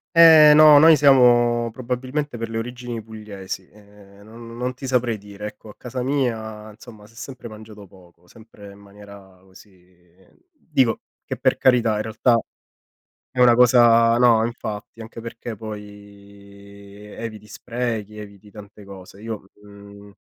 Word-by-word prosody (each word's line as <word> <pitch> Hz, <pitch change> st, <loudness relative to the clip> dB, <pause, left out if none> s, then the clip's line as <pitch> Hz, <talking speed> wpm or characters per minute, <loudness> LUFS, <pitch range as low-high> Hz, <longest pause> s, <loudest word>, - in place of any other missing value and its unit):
Eh, 160 Hz, -2 st, +8 dB
no, 155 Hz, -1 st, +7 dB
noi 160 Hz, +2 st, +7 dB
siamo 120 Hz, -4 st, +3 dB
probabilmente 130 Hz, +3 st, -5 dB
per 115 Hz, -, -5 dB
le 115 Hz, -, -3 dB
origini 120 Hz, -1 st, -7 dB
pugliesi, 105 Hz, -4 st, -9 dB
ehm, 100 Hz, -1 st, -20 dB
no 110 Hz, +2 st, -15 dB
non 120 Hz, +2 st, -6 dB
ti 135 Hz, -, -10 dB
saprei 125 Hz, -3 st, -1 dB
dire. 105 Hz, +1 st, -10 dB
Ecco, 105 Hz, -, -13 dB
a -, -, -14 dB
casa 125 Hz, 0 st, -6 dB
mia 110 Hz, -6 st, -3 dB
insomma 105 Hz, 0 st, -15 dB
si 115 Hz, -, -23 dB
è -, -, -25 dB
sempre 130 Hz, -1 st, -10 dB
mangiato 110 Hz, -2 st, -13 dB
poco, 90 Hz, -2 st, -22 dB
sempre 105 Hz, -1 st, -16 dB
in -, -, -18 dB
maniera 100 Hz, -2 st, -16 dB
così 90 Hz, -2 st, -23 dB, 0.2 s
dico 135 Hz, -, -1 dB, 0.2 s
che -, -, -5 dB
per -, -, 0 dB
carità 120 Hz, -4 st, +2 dB
in 105 Hz, -, -3 dB
realtà 115 Hz, +2 st, +1 dB, 1.0 s
è 125 Hz, -, -4 dB
una 120 Hz, -1 st, +5 dB
cosa 120 Hz, -2 st, +5 dB
no, 115 Hz, -2 st, +4 dB
infatti, 110 Hz, -2 st, -8 dB
anche 115 Hz, +1 st, -10 dB
perché 115 Hz, -1 st, -8 dB
poi 100 Hz, -1 st, -13 dB
eviti 110 Hz, 0 st, -9 dB
sprechi, 115 Hz, -4 st, -5 dB
eviti 100 Hz, -1 st, -13 dB
tante 105 Hz, -1 st, -14 dB
cose. 95 Hz, 0 st, -14 dB
Io, 110 Hz, -3 st, -8 dB, 0.2 s
mhmm 100 Hz, 0 st, -15 dB
110 Hz, 150 wpm, -21 LUFS, 100-120 Hz, 1.0 s, Eh